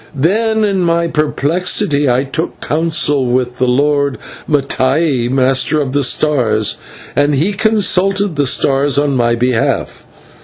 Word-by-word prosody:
Then 220 +9 +1
in 200 -3 0
my 170 -1 +1
perplexity 150 -1 0
I 125 +2 +1
took 155 +4 -4
counsel 155 -4 0
with 125 0 -1
the 130 - +1
Lord 140 +2 +1 0.3
Mattai, 135 -2 0
Master 135 +3 +1
of 135 -3 -3
the 145 0 +1
Stars, 120 -6 +1 0.4
and 145 0 +2
he 165 +9 0
consulted 200 -3 +1
the 145 -1 0
stars 140 +2 +1
on 145 -1 +1
my 120 -1 +1
behalf. 120 -1 -2
145 Hz, 130 wpm, -14 LUFS, 130-170 Hz, 0.4 s, and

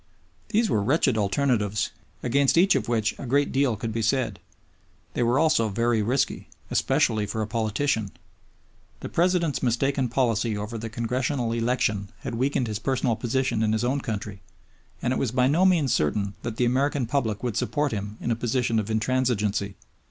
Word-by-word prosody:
These 225 +1 +2
were 105 - +1
wretched 130 +2 +2
alternatives, 105 -1 0 0.3
against 140 +5 +2
each 190 +3 +5
of - - -1
which 110 -3 +1
a 135 - -6
great 140 +3 +2
deal 135 -3 +2
could 110 +1 -4
be 115 - -1
said. 130 +4 0 0.7
They - - -1
were 120 +2 +2
also 155 -8 +3
very 115 +2 +1
risky, 130 +5 0 0.2
especially 105 -2 +1
for 110 +2 -2
a - - -4
politician. 110 0 0 0.9
The - - -5
President's 170 -3 +1
mistaken 130 +2 +1
policy 115 -3 +1
over 105 +3 -5
the 115 +1 -5
Congressional 120 +2 -1
election 115 -4 0
had - - -5
weakened 130 +2 0
his 105 -2 -3
personal 130 -2 0
position 125 -1 -1
in 110 -1 +2
his 110 - 0
own 135 +3 0
country, 105 -4 -5 0.6
and 125 - +1
it - - -1
was 130 - 0
by 125 +2 +2
no 160 +8 +3
means 160 -8 +3
certain 100 +7 0
that 115 -1 -5
the 125 - +2
American 135 +2 +1
public 115 -4 -1
would 120 -4 -2
support 145 -1 0
him 105 0 -4
in 120 - -2
a - - +2
position 120 -1 0
of 105 - -3
intransigeancy. 110 -4 0
120 Hz, 175 wpm, -25 LUFS, 110-135 Hz, 0.9 s, each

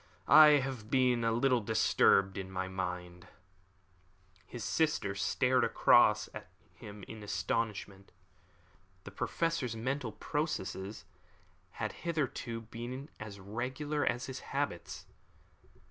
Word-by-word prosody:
I 155 -1 +9
have 120 -6 -6
been 125 -3 +2
a 115 - +2
little 125 +1 +2
disturbed 100 -2 +3
in 95 -1 -5
my 95 0 -3
mind." 90 -1 -5 1.2
His 120 - -7
sister 155 -11 0
stared 125 +5 +1
across 115 -1 +4
at - - -8 0.3
him 105 -1 -11
in 110 -1 -9
astonishment. 105 -2 -3 0.9
The - - -9
Professor's 160 -8 -1
mental 125 0 -3
processes 105 - -4 0.7
had - - -3
hitherto 135 -8 -3
been 120 +5 -7
as 105 -2 -8
regular 130 +9 -3
as 120 +1 0
his 130 -1 -6
habits. - - -4
115 Hz, 110 wpm, -32 LUFS, 100-130 Hz, 1.2 s, I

